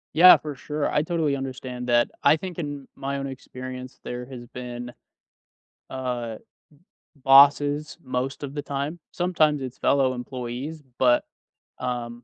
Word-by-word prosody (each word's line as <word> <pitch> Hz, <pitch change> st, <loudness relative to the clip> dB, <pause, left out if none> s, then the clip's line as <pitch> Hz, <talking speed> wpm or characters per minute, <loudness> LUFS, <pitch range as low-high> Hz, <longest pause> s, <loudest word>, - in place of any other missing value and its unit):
Yeah, 180 Hz, +3 st, +10 dB
for 150 Hz, -2 st, -6 dB
sure. 150 Hz, +2 st, -2 dB
I 150 Hz, -, +3 dB
totally 160 Hz, -4 st, 0 dB
understand 130 Hz, -2 st, -5 dB
that. 120 Hz, 0 st, +3 dB
I -, -, +7 dB
think 175 Hz, +1 st, -6 dB
in 145 Hz, -3 st, -5 dB
my 140 Hz, +1 st, -3 dB
own 140 Hz, -, -3 dB
experience, 130 Hz, -1 st, -8 dB
there 125 Hz, 0 st, -5 dB
has 125 Hz, -2 st, -9 dB
been, 120 Hz, 0 st, -7 dB, 1.0 s
uh, 125 Hz, -4 st, -3 dB, 0.8 s
b 140 Hz, -, -25 dB
bosses 145 Hz, +2 st, +6 dB
most 130 Hz, +2 st, -3 dB
of 140 Hz, 0 st, -5 dB
the 145 Hz, -, -2 dB
time. 145 Hz, +3 st, -3 dB
Sometimes 160 Hz, -5 st, +2 dB
it's 130 Hz, -1 st, -6 dB
fellow 135 Hz, -2 st, +3 dB
employees. 125 Hz, +5 st, -5 dB, 0.2 s
But, 125 Hz, -2 st, +4 dB, 0.5 s
um, 120 Hz, -1 st, -4 dB
135 Hz, 140 wpm, -25 LUFS, 125-145 Hz, 1.0 s, Yeah